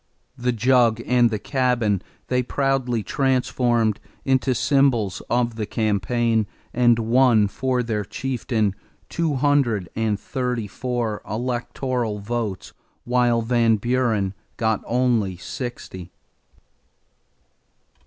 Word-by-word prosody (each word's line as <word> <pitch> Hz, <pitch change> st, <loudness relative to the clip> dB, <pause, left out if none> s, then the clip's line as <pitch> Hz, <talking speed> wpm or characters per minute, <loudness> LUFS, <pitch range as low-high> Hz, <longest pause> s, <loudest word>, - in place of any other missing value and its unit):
The 125 Hz, -1 st, 0 dB
jug 120 Hz, -1 st, +3 dB
and 120 Hz, -1 st, +4 dB
the 110 Hz, -, -2 dB
cabin 120 Hz, -5 st, 0 dB, 0.3 s
they 125 Hz, 0 st, +1 dB
proudly 125 Hz, -3 st, 0 dB
transformed 120 Hz, -3 st, +1 dB, 0.3 s
into 130 Hz, -1 st, +2 dB
symbols 125 Hz, -8 st, +2 dB
of 120 Hz, -1 st, 0 dB
the 105 Hz, -2 st, -3 dB
campaign, 110 Hz, +1 st, 0 dB, 0.3 s
and 120 Hz, -1 st, +4 dB
won 115 Hz, -2 st, +4 dB
for 125 Hz, +4 st, -1 dB
their 110 Hz, -3 st, -2 dB
chieftain 115 Hz, -3 st, -1 dB, 0.4 s
234 120 Hz, -, -1 dB
electoral 120 Hz, 0 st, -2 dB
votes, 105 Hz, -2 st, -4 dB, 0.3 s
while 120 Hz, -1 st, +2 dB
Van 115 Hz, -1 st, +3 dB
Buren 110 Hz, -4 st, 0 dB, 0.2 s
got 110 Hz, -2 st, 0 dB
only 115 Hz, -7 st, +1 dB
sixty. 95 Hz, -5 st, -7 dB
120 Hz, 90 wpm, -23 LUFS, 110-125 Hz, 0.4 s, and